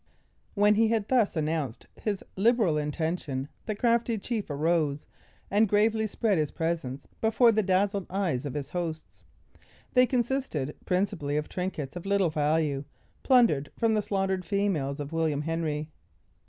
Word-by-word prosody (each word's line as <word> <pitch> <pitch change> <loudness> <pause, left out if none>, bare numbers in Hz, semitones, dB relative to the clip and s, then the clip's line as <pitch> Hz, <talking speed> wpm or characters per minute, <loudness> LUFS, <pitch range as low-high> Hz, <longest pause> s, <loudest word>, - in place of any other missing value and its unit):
When 205 0 +5
he 220 +2 +3
had 220 -2 0
thus 240 -8 +3
announced 155 -6 -2
his 205 -3 -3
liberal 215 -4 +3
intention, 150 -2 -2 0.2
the 215 - -1
crafty 235 0 +1
chief 215 -1 -3
arose, 150 -1 0 0.5
and 210 +1 +3
gravely 220 +2 +2
spread 210 -3 +1
his 150 -2 0
presents 160 -5 -3 0.2
before 225 +2 +5
the 215 0 +2
dazzled 195 0 +1
eyes 180 -9 -1
of 145 -2 -5
his 145 0 -4
hosts. 165 -3 -5 0.7
They 250 0 +5
consisted 240 - -1
principally 180 -6 0
of 150 - -2
trinkets 180 -7 -4
of 175 +2 -6
little 195 -4 +2
value, 150 -2 +1 0.4
plundered 230 - +4
from 230 -1 +2
the 215 - +2
slaughtered 190 -2 -1
females 165 -7 -1
of 145 +2 -5
William 155 -3 0
Henry. 155 -1 -2
180 Hz, 145 wpm, -28 LUFS, 150-215 Hz, 0.7 s, When